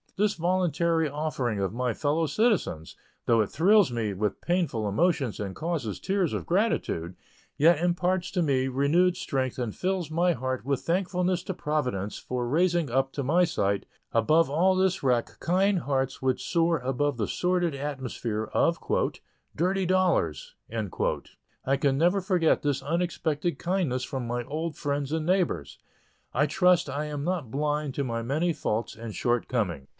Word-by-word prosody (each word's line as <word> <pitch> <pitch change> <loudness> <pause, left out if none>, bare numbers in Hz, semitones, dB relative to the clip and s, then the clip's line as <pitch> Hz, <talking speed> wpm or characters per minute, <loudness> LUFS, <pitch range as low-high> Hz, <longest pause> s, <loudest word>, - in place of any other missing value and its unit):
This 210 +1 +2
voluntary 170 -2 +1
offering 135 -7 -2
of 95 0 -1
my 125 0 -1
fellow 155 +4 0
citizens, 180 - 0 0.3
though 115 -1 +4
it 105 - -1
thrills 195 0 +4
me 110 -4 -1
with 105 +2 -2
painful 170 - 0
emotions 140 - +1
and 100 -2 -4
causes 155 - -3
tears 190 -4 0
of - - -3
gratitude, 170 - 0 0.4
yet 160 +1 +5
imparts 175 +1 +1
to 180 -2 +1
me 135 -3 +1
renewed 150 +8 +2
strength 130 -7 -2
and 120 -5 -3
fills 185 -4 -2
my 175 +2 +2
heart 130 -2 -3
with 140 -1 0
thankfulness 180 0 0
to 190 - -4
Providence 125 - -2
for 125 -1 -3
raising 170 +2 +2
up 135 +1 +1
to 140 - -2
my 170 +7 +3
sight, 100 - -1 0.2
above 155 +9 +3
all 180 +6 +3
this 190 0 +1
wreck, 125 -3 0
kind 190 +2 +2
hearts 135 -3 -1
which 130 -1 0
soar 165 -1 +2
above 135 +2 -1
the 105 -4 -1
sordid 180 -2 0
atmosphere 130 -6 -3
of 170 - +3 0.8
"dirty 185 +3 +1
dollars." 180 - +1 1.1
I 135 +1 +2
can 135 -1 +1
never 175 +6 +3
forget 180 -4 +2
this 145 -2 -1
unexpected 165 0 -1
kindness 170 -9 -1
from 130 -3 -4
my 120 +1 -2
old 155 +5 -4
friends 145 -1 -2
and 160 -1 -1
neighbors. 170 - 0 0.5
I 140 +4 +3
trust 180 -1 +3
I 145 +3 -2
am 145 -1 -4
not 170 -7 -2
blind 150 0 -1
to 140 - 0
my 115 -3 -2
many 155 +8 0
faults 115 -5 -2
and 115 -1 -7
shortcomings. 115 - -1
150 Hz, 160 wpm, -27 LUFS, 125-175 Hz, 1.1 s, yet